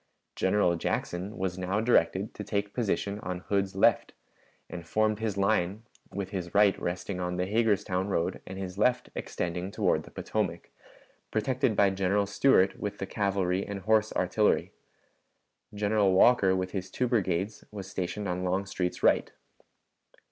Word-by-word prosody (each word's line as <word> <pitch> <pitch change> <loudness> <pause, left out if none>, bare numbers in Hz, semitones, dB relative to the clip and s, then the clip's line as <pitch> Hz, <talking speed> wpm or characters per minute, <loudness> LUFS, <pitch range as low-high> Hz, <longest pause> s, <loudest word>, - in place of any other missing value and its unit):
General 95 -2 +2
Jackson 90 +4 -3
was 95 -1 -2
now 95 +3 -1
directed 110 -3 +2
to 105 - -6
take 100 0 -2
position 105 -3 -1
on 90 -2 -5
Hood's 100 -1 -1
left, 95 - +3 0.5
and 85 - -7
formed 110 +5 +1
his 110 -3 -2
line 100 0 +1 0.3
with 100 -1 -5
his 90 -2 -5
right 100 -2 +5
resting 90 +2 -3
on 90 0 -2
the 90 - 0
Hagerstown 100 -3 +1
road 85 -4 -1
and 95 - -7
his 95 0 -6
left 125 +3 +2
extending 90 +2 -3
toward - - +1
the - - -13
Potomac, 95 -6 -3 0.6
protected 120 +1 0
by 100 -1 +4
General 95 +1 +1
Stuart 100 -2 +3
with 105 -1 -4
the 95 - -3
cavalry 95 -2 0
and 100 -1 -6
horse 110 +2 +2
artillery. 100 +4 +1 1.0
General 105 -1 +2
Walker 95 -1 +5
with 95 0 -2
his 95 -1 -4
two 125 +6 -1
brigades 100 -3 -1
was 100 -3 -7
stationed 100 +1 -4
on 90 0 -2
Longstreet's 95 -1 -2
right. - - +3
100 Hz, 150 wpm, -29 LUFS, 90-105 Hz, 1.0 s, right